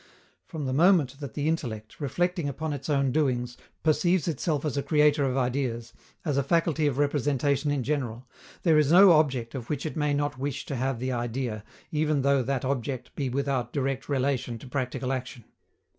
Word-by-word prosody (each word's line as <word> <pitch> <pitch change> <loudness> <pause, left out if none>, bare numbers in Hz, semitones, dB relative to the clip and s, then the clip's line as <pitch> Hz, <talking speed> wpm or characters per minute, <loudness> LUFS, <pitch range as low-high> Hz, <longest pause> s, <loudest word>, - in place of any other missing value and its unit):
From 155 -5 -5
the 130 - -1
moment 150 -4 +3
that 140 -6 -7
the 145 +1 -1
intellect, 115 -10 -3
reflecting 170 +2 0
upon 155 +3 -3
its 145 +2 -6
own 140 -2 +2
doings, 125 -4 0 0.3
perceives 175 +2 +2
itself 155 -1 -1
as 150 - -1
a 140 - +1
creator 150 -1 +3
of 130 0 0
ideas, 125 -2 -1 0.3
as 145 -4 0
a 140 - +2
faculty 160 0 +1
of 135 -3 -1
representation 145 0 +1
in 145 -3 0
general, 130 -3 -3 0.4
there 160 -3 +5
is 150 0 +2
no 190 +2 +8
object 135 -7 +2
of 125 -4 -6
which 145 -1 -2
it 155 - -4
may 150 -2 +1
not 145 -2 -2
wish 140 0 -3
to 140 - -4
have 130 0 -1
the 130 +2 -2
idea, 120 -2 -3 0.3
even 150 -2 +1
though 140 -1 +3
that 130 +1 -2
object 130 -1 -3
be 135 -3 -2
without 130 -2 -1
direct 135 0 -2
relation 130 -3 0
to 115 - -12
practical 130 0 -2
action. 125 -2 -5
140 Hz, 190 wpm, -27 LUFS, 130-150 Hz, 0.4 s, no